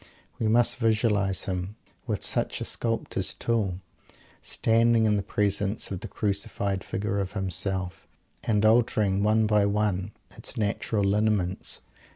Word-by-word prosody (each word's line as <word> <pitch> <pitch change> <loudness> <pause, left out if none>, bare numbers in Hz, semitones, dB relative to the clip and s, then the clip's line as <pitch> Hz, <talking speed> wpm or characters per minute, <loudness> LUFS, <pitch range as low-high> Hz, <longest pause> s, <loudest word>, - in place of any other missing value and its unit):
We 110 - +1
must 120 +3 +4
visualize 110 -4 +1
him, 95 +2 -3 0.3
with 105 -6 -2
such - - 0
a - - -4
sculptor's 115 -1 -2
tool, 100 -6 -1 0.6
standing 115 0 +3
in 105 -1 +3
the 100 - +1
presence 100 +1 -1
of 95 - -3
the 110 - -7
crucified 100 -1 -2
figure 100 -2 -2
of 95 -1 -3
himself; 95 -1 -1 0.4
and 105 -1 +1
altering 110 -3 +3
one 110 +1 +3
by 105 -1 +3
one, 100 -1 0 0.2
its - - -4
natural 105 0 0
lineaments! 100 -2 0
105 Hz, 135 wpm, -27 LUFS, 95-110 Hz, 0.6 s, must